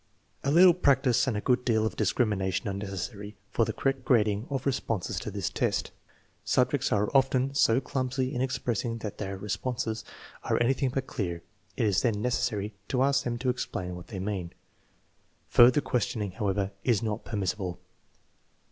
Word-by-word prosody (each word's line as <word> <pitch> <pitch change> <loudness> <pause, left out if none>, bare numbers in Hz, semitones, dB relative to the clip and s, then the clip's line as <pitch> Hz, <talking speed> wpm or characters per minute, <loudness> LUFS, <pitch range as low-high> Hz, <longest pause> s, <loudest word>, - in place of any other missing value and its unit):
A 140 - 0
little 175 +3 +8
practice 135 -6 +3
and 115 -5 0
a - - -2
good 125 +2 +2
deal 110 -3 +2
of 110 - -2
discrimination 105 -3 0
are 100 - -1
necessary 100 +1 -5 0.2
for 115 - +2
the - - -2
correct 135 -1 -1
grading 110 -2 +2
of 135 -2 -3
responses 120 -8 -1
to - - -5
this - - -3
test. - - -1 0.5
Subjects - - +1
are 105 +4 +1
often 135 0 +3
so 125 -3 +4
clumsy 130 0 -2
in 125 - -1
expression 120 -3 -1
that 110 -3 -6
their 100 -1 -4
re 100 - -8
sponses 115 0 -2 0.4
are - - +1
anything 130 +2 +2
but 135 +1 -2
clear. 85 -9 -4 0.3
It 115 - +2
is 100 -4 +2
then 115 -4 +1
necessary 105 -3 -1
to 130 -1 +1
ask 140 0 +2
them 120 -1 -1
to 130 +1 -1
explain 90 -7 -4
what 90 0 -10
they 95 - -7
mean. 95 -3 -3 1.0
Further 125 +4 +6
questioning, 120 -6 -1
however, 100 0 -1
is 115 -3 +2
not 110 0 -2
permissible. 95 -3 -3
115 Hz, 170 wpm, -28 LUFS, 100-130 Hz, 1.0 s, little